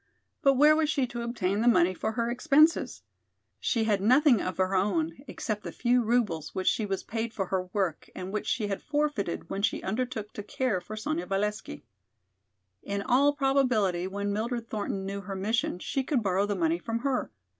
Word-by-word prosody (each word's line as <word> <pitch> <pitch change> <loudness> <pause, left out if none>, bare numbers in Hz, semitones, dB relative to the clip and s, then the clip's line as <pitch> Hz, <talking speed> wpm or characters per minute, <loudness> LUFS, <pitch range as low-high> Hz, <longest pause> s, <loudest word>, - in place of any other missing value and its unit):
But 275 -3 +4
where 300 +3 +6
was 310 -1 +1
she 280 -4 +1
to 240 -1 -6
obtain 210 -4 -1
the 235 - +2
money 185 -6 +5
for 220 +4 -3
her 235 +1 -1
expenses? 300 +6 +3 0.6
She 230 - 0
had 210 -3 +1
nothing 255 +2 +5
of 185 - -3
her 185 +1 +1
own 180 -4 +1
except 215 -4 -4
the - - -6
few 245 0 +2
roubles 215 -10 0
which 185 - -2
she 215 - +2
was 195 -1 -2
paid 225 0 -4
for 195 - -1
her 185 0 -2
work 185 -6 -2
and 185 +2 -6
which 210 - -3
she 225 -5 0
had 195 -1 -3
forfeited 290 - -2
when 195 - -2
she 205 - 0
undertook 220 0 -3
to - - -5
care 210 -2 -1
for 210 +5 -8
Sonya 310 +9 -2
Valesky. 195 - -2 1.0
In 200 0 -3
all 275 +3 +4
probability 250 - +1
when 200 +1 -3
Mildred 230 +2 -2
Thornton 200 -3 -3
knew 200 +1 -4
her 195 0 -6
mission 205 0 -1
she 265 +8 -2
could 255 -3 0
borrow 195 +1 +1
the 205 - -1
money 165 -2 +1
from 230 +5 -3
her. 270 -1 -1
215 Hz, 195 wpm, -28 LUFS, 195-250 Hz, 1.0 s, where